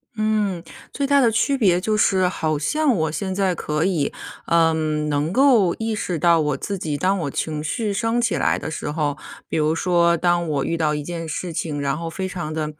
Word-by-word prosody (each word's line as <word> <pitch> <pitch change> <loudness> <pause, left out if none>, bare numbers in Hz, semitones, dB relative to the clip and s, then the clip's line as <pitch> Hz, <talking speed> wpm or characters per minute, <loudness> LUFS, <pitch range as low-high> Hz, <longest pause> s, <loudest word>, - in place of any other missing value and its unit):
嗯， 215 -5 0 0.3
最 280 - -2
大 280 0 +4
的 230 -2 +4
区 275 +5 +1
别 185 -8 +3
就 215 +3 0
是 190 -3 +3
好 155 -4 -1
像 285 - +1
我 160 -3 0
现 190 +3 -3
在 190 -2 +1
可 155 0 -2
以， 175 -7 0 0.4
嗯， 160 -2 +2
能 150 +2 0
够 235 -8 +4
意 225 0 -3
识 180 -5 -2
到 170 +1 +4
我 150 -2 0
自 200 -1 -4
己， 155 -4 -3
当 190 +5 +1
我 145 -5 -3
情 155 -1 -3
绪 210 +6 -2
升 225 +3 0
起 230 -6 +1
来 - - +1
的 - - -5
时 150 - -4
候， 150 -2 -1 0.3
比 - - -4
如 155 0 +1
说 170 -1 +2
当 175 0 +1
我 140 -2 0
遇 165 - -1
到 155 -2 0
一 150 - -4
件 165 0 -5
事 170 +2 -4
情， 150 -2 -3
然 140 +1 -1
后 165 0 -4
非 190 +3 -4
常 175 -4 -5
地 155 -1 -3
170 Hz, 235 characters per minute, -22 LUFS, 155-200 Hz, 0.4 s, 大